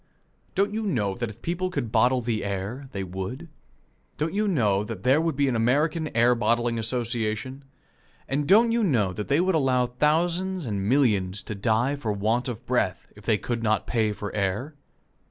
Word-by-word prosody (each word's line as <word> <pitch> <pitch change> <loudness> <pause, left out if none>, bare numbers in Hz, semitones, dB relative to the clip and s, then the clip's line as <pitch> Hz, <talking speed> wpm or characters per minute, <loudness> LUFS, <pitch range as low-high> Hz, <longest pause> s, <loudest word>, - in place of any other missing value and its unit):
Don't 200 +2 +1
you 220 - -1
know 120 - 0
that 120 +2 -3
if 110 +2 -13
people 180 +2 -1
could 135 -10 -3
bottle 125 +3 +3
the 115 -2 -2
air, 100 +7 -4
they 95 - -4
would? 95 - -6 0.7
Don't 155 +3 -1
you 210 +1 +1
know 105 - +2
that 105 -3 -7
there 135 +5 +4
would 165 -3 -1
be 140 0 +2
an 130 - 0
American 150 +8 +1
Air 120 +2 +5
bottling 115 0 +1
Association? 120 +2 -2 0.6
And 140 +1 -1
don't 225 +5 +6
you 230 0 +2
know 115 - +2
that 105 +2 -5
they 140 - +2
would 185 +2 +2
allow 130 -5 +2
thousands 170 +7 0
and 100 -3 -2
millions 105 -8 +2
to - - -5
die 115 +6 +1
for 120 -7 -3
want 110 +5 0
of 125 0 -6
breath, 115 -7 -1
if 105 -1 -15
they 110 -3 +3
could 115 +3 -3
not 110 -1 +1
pay 110 -3 +1
for 105 0 -6
air? 105 +9 -1
120 Hz, 190 wpm, -25 LUFS, 105-150 Hz, 0.7 s, don't